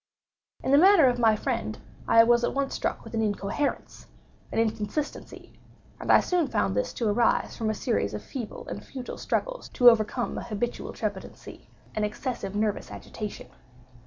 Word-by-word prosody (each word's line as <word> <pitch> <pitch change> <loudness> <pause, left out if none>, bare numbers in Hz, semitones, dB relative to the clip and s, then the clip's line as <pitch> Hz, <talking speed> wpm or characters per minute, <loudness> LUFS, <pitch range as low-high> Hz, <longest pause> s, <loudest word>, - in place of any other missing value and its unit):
In - - 0
the 280 - +7
manner 375 -3 +7
of 245 -1 +1
my 225 -2 +5
friend 110 - -3 0.3
I 230 - +7
was 240 +1 +3
at - - 0
once 275 -1 -1
struck - - -2
with - - -11
an 225 - 0
incoherence—an 210 +6 -4
inconsistency; 225 +6 -3 0.5
and - - 0
I - - +7
soon 355 -4 +1
found 95 - 0
this 100 - 0
to 230 - -1
arise 225 +3 +2
from 220 -1 -2
a 215 - -1
series 155 - -1
of 105 - -6
feeble 240 -6 -7
and - - -6
futile 255 -2 -8
struggles - - -2
to 245 -1 +7
overcome 230 +2 -1
an - - -7
habitual 235 +1 -3
trepidancy—an 215 - -7
excessive 210 -1 -3
nervous 210 -1 -1
agitation. 210 - -7
230 Hz, 160 wpm, -27 LUFS, 210-260 Hz, 0.5 s, the